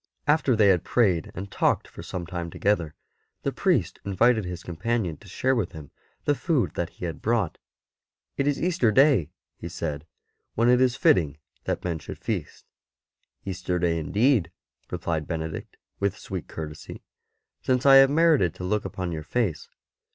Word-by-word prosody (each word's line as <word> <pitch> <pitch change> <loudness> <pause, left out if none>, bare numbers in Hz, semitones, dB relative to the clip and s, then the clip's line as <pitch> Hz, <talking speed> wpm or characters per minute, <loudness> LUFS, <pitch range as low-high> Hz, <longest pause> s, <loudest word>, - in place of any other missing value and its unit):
After 145 -4 +3
they 105 -2 +5
had 90 -3 +3
prayed 95 -9 +2
and 95 +2 -6
talked - - +1
for - - -11
some 90 -2 -5
time 85 0 -5
together, 85 -5 0 0.5
the - - 0
priest - - 0
invited 110 +3 +2
his 90 -1 -6
companion 90 +1 -2
to 105 - -17
share 130 +8 0
with 110 -7 -1
him 75 -3 -10 0.3
the 145 - +3
food 145 -3 0
that 85 -1 -2
he - - -6
had 80 -3 -5
brought. 110 -7 0 0.4
'' - - -68 0.4
It 140 - 0
is 145 - +1
Easter 170 -10 +2
Day,'' 130 - +4 0.3
he 85 - -7
said, 75 -3 -4 0.2
'* - - -51
when 115 +2 +3
it 125 +1 +5
is 130 -1 +3
fitting 75 - +3 0.3
that - - -2
men 85 -3 -2
should - - -8
feast." - - -4 0.4
" - - -48
Easter 90 -1 -2
Day 85 -1 +1
indeed," 105 - +2 0.4
replied 80 -3 -2
Benedict 80 -2 -5 0.2
with 100 -1 0
sweet 95 -6 -6
courtesy, 75 -1 -8 0.3
" - - -55
since 125 0 0
I 135 -1 +9
have 135 0 +8
merited 150 - +3
to - - -8
look 105 +3 -1
upon 90 -2 -4
your 80 -2 -4
face." 105 0 -2
95 Hz, 180 wpm, -26 LUFS, 85-125 Hz, 0.5 s, I